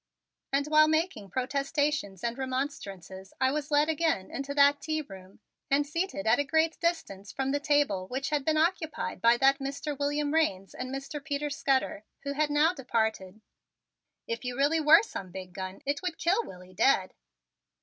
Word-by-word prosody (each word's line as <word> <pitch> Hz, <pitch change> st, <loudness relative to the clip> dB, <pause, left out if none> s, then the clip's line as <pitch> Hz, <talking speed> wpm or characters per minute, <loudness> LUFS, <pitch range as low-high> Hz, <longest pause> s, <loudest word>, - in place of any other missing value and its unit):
And 280 Hz, +1 st, +1 dB
while 310 Hz, 0 st, +5 dB
making 315 Hz, -, 0 dB
protestations 275 Hz, -, -1 dB
and 235 Hz, 0 st, -1 dB
remonstrances 205 Hz, -, -5 dB
I 260 Hz, 0 st, +3 dB
was 295 Hz, 0 st, -3 dB
led 295 Hz, 0 st, +3 dB
again 320 Hz, -, 0 dB
into 275 Hz, +1 st, -4 dB
that 285 Hz, 0 st, +5 dB
tea 310 Hz, +1 st, -2 dB
room 190 Hz, -4 st, -13 dB, 0.3 s
and 285 Hz, +1 st, +3 dB
seated 335 Hz, 0 st, -3 dB
at 220 Hz, -, +4 dB
a -, -, +3 dB
great 320 Hz, +2 st, +1 dB
distance 265 Hz, -, -2 dB
from 270 Hz, 0 st, -2 dB
the 285 Hz, -, +1 dB
table 285 Hz, -11 st, +1 dB
which 270 Hz, +6 st, -3 dB
had 295 Hz, -2 st, +1 dB
been 310 Hz, +2 st, +1 dB
occupied 320 Hz, -1 st, -1 dB
by 235 Hz, +1 st, +5 dB
that 275 Hz, +2 st, +4 dB
Mr. 280 Hz, +2 st, -4 dB
William 290 Hz, +1 st, -1 dB
Raines 195 Hz, -13 st, 0 dB
and 255 Hz, -, -5 dB
Mr. 275 Hz, +2 st, -6 dB
Peter 290 Hz, 0 st, -2 dB
Scudder, 270 Hz, -6 st, 0 dB, 0.2 s
who 280 Hz, 0 st, -3 dB
had 300 Hz, +1 st, +1 dB
now 300 Hz, +4 st, +3 dB
departed. 220 Hz, -, -2 dB, 0.8 s
"If 230 Hz, +2 st, -4 dB
you 250 Hz, 0 st, -4 dB
really 290 Hz, +4 st, +3 dB
were 315 Hz, +5 st, +7 dB
some 195 Hz, -, -7 dB
big 185 Hz, 0 st, -9 dB
gun 185 Hz, 0 st, -7 dB
it 285 Hz, +1 st, -1 dB
would 360 Hz, -3 st, -3 dB
kill 390 Hz, +7 st, +1 dB
Willie 180 Hz, 0 st, -12 dB
dead." 190 Hz, -2 st, +2 dB
280 Hz, 175 wpm, -29 LUFS, 230-300 Hz, 0.8 s, were